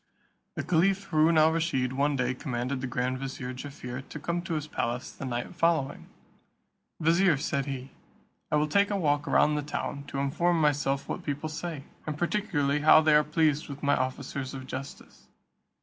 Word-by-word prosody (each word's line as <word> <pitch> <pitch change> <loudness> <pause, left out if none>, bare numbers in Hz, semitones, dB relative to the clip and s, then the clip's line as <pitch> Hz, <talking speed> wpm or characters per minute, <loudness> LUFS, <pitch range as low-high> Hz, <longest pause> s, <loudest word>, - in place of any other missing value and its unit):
The - - -2
Caliph 190 +3 +2
Haroon 160 +1 +4
al 155 +1 +6
Rusheed 155 -6 0
one 140 +2 +1
day 125 -1 0
commanded 130 0 -3
the 130 - -2
grand 125 +1 -1
vizier 130 -1 -5
Jaffier 130 -1 -7
to 150 - -7
come 170 +3 -2
to 170 -1 -3
his 150 -1 -2
palace 120 -4 -3
the - - -8
night 120 +4 -3
following. 165 -5 0 0.9
"Vizier," 170 0 +4
said 140 0 -1
he, 135 -1 -5 0.6
"I - - +3
will 150 0 +2
take 200 +6 +3
a 205 - 0
walk 145 -5 +1
round 150 - +4
the 150 - 0
town, 140 -1 -4
to 140 - -6
inform 165 +5 +1
myself 145 -2 +1
what - - -4
people 145 +1 -3
say, 155 -2 -5 0.2
and 150 -1 -3
particularly 165 -6 0
how 155 +1 +7
they 155 -1 +4
are 150 0 +6
pleased 150 -1 +1
with 140 +1 -8
my 145 0 +4
officers 130 +1 -3
of 130 -1 -7
justice. 135 +1 -8
145 Hz, 180 wpm, -28 LUFS, 135-160 Hz, 0.9 s, how